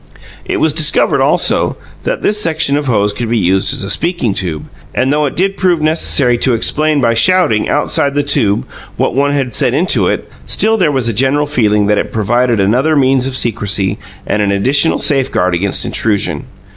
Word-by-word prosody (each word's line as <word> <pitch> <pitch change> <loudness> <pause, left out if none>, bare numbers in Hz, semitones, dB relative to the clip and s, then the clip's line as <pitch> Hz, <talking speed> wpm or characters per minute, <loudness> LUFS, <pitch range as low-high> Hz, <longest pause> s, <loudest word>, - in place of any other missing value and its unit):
It - - -2
was - - +1
discovered, - - +2
also, - - +1 0.3
that - - -3
the - - +1
section 165 -8 0
of 145 0 -2
hose 105 -4 +1
could 115 +2 -4
be 120 - 0
used 95 -1 +1
as - - -2
a 100 - -5
speaking 165 - -1
tube; 85 -6 -4 0.3
and 130 +3 +1
though 150 0 +1
it - - -6
did 195 +2 -1
prove 180 -3 +1
necessary 150 -5 +1
to 125 -1 +1
explain 150 +5 +1
by 115 -2 +2
shouting 115 -4 +2
outside 145 -1 0
the 145 - +1
tube 105 -7 +1 0.3
what - - -1
one 140 +2 +1
had 135 -4 -2
said 125 - +1
into 175 +6 +1
it, - - -2 0.2
still 220 +1 +2
there 180 -8 +1
was 130 -4 -1
a 115 - 0
general 135 +6 +1
feeling 105 -8 +1
that 105 0 +1
it - - -4
provided 120 +2 0
another 125 +11 +1
means 135 -2 +2
of 130 -1 -4
secrecy 100 -5 -1 0.3
and 105 - -1
an 100 -1 0
additional 135 +10 +2
safeguard 130 - 0
against 95 +3 0
intrusion. 105 -3 -1
130 Hz, 195 wpm, -13 LUFS, 105-150 Hz, 0.3 s, discovered